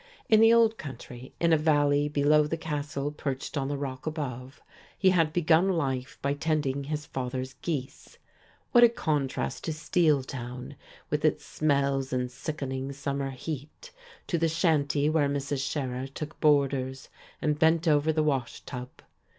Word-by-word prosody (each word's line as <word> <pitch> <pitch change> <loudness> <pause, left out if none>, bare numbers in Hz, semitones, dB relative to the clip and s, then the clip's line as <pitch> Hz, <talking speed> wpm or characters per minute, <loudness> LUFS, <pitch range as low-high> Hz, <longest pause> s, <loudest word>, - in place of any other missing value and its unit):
In 220 - +6
the 225 +1 +7
old 230 -1 +4
country, 130 -2 -9
in 170 -1 +3
a 160 - +4
valley 145 -1 +3
below 150 +1 +3
the 165 - -2
castle 145 -2 -3
perched 140 -1 -4
on 135 -2 -1
the 145 0 -2
rack 135 0 -5
above, 135 -4 -5 0.4
he 190 -1 +4
had 165 -4 +3
begun 170 +2 +3
life 135 -7 -1
by 140 0 +1
tending 145 -2 -1
his 150 0 -3
father's 130 -1 -4
geese. 140 -5 -5 0.5
What 240 -1 +7
a 240 - +9
contrast 145 - -2
to 160 - -1
"Steeltown" 140 -5 -1 0.4
with 150 0 0
its 150 -1 +1
smells 140 -3 0
and 125 -1 -1
sickening 135 -1 -4
summer 140 0 -3
heat, 150 - -7 0.3
to 170 - -1
the 165 0 +2
shanty 150 -3 +2
where 155 -2 +2
Mrs. 140 -1 -2
Scherer 130 -3 -3
took 150 +3 -8
boarders 140 -3 +1 0.3
and 150 -1 0
bent 165 +1 +3
over 150 0 +4
the 155 0 +1
wash 135 -5 -1
tub! 125 -1 -7
145 Hz, 155 wpm, -28 LUFS, 135-155 Hz, 0.5 s, a